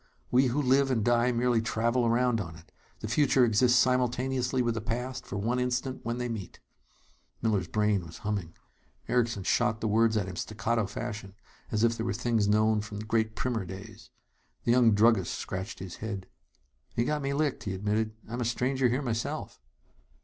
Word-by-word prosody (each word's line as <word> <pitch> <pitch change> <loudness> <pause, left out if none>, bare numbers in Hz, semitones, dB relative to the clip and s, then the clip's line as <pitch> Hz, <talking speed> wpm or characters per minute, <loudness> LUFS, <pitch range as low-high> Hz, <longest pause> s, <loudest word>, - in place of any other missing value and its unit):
We 130 +2 +5
who 125 +4 0
live 135 0 +3
and 115 -5 +1
die 120 +1 +3
merely 120 -1 +2
travel 115 +2 +1
around 120 -1 +2
on 80 -4 -7
it. 80 +1 -16 0.3
The - - -3
future 130 +1 +4
exists 120 +2 +4
simultaneously 125 0 +1
with 120 -1 +1
the 110 - -3
past, 125 +3 -4
for 100 - -4
one 115 +5 0
instant 125 +1 -1
when 115 +1 -2
they 125 0 -2
meet." 110 -6 -6 0.8
Miller's 105 -6 +1
brain 105 -2 +1
was 85 0 -10
humming. 100 -6 -2 0.5
Erickson 115 -5 +1
shot 115 +3 +1
the 110 - -1
words 110 +1 +3
at 100 -3 -1
him 95 - -6
staccato 110 +2 -1
fashion, 105 -2 -6 0.4
as 110 0 +1
if 115 0 +3
they 115 - -2
were 115 - -1
things 115 -1 +1
known 110 +1 +3
from 105 0 -7
Great 110 0 0
Primer 120 -5 -1
days. 95 +4 -10 0.5
The 115 - +2
young 120 -2 +5
druggist 105 -3 +3
scratched 95 +1 -5
his 95 -2 -8
head. 100 -4 -5 0.7
"You've 120 - +1
got 150 +2 0
me 140 0 -1
licked," 145 -2 -1
he 95 -2 -2
admitted. 105 +3 -1
"I'm 120 +3 -4
a - - +1
stranger 125 +2 +1
here, 130 +4 0
myself." 115 - -3
115 Hz, 185 wpm, -29 LUFS, 105-125 Hz, 0.8 s, We